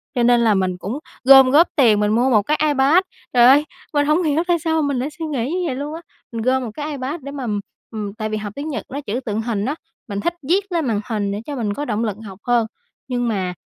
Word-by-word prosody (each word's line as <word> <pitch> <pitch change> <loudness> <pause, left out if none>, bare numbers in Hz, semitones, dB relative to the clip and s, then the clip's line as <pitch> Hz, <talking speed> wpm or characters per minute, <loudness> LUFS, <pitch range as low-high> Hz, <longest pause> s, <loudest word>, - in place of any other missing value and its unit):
cho 240 - +2
nên 240 0 +4
là 220 -2 +4
mình 185 -2 0
cũng 215 +11 -5 0.2
gom 265 0 +8
góp 330 +5 +6
tiền 225 -8 +4
mình 210 0 +1
mua 245 +4 +3
1 215 -4 +4
cái 300 +8 0
Ipad, 295 +4 +4 0.3
trời 240 -1 +6
ơi, 285 +4 +6 0.3
mình 290 0 +2
hổng 310 +4 +2
hiểu 310 +2 +1
tại 345 -2 +2
sao 320 -1 0
mình 280 -3 0
lại 275 +4 -2
suy 325 - -3
nghĩ 280 -2 -2
như 360 -1 -1
vậy 260 - -2
luôn 290 +3 -5
á. 335 - -8 0.3
Mình 230 -1 -4
gom 260 +2 +1
1 225 - -5
cái 300 +1 -5
ipad 280 +3 -4
để 280 +1 -7
mà, 275 -3 -5 0.5
ừm, 210 -2 -5
tại 215 -1 -4
vì 215 - -2
học 205 -1 -6
tiếng 290 +3 -5
Nhật 240 -9 -4
nó 280 +2 -5
chữ 235 -1 -3
tượng 215 -1 -2
hình 220 -3 -2
á, 285 - -1 0.3
mình 200 -1 -4
thích 345 +12 -1 0.2
viết 390 +1 +1
lên 330 -4 0
màn 215 -3 0
hình 205 -3 -1
để 205 +2 -4
cho 290 - -5
mình 215 -5 -2
có 290 +5 -4
động 220 -2 -1
lực 210 -3 -2
học 195 -1 -10
hơn, 235 -2 +3 0.4
nhưng 245 -2 -1
mà 190 -5 -1
255 Hz, 270 wpm, -20 LUFS, 215-295 Hz, 0.5 s, gom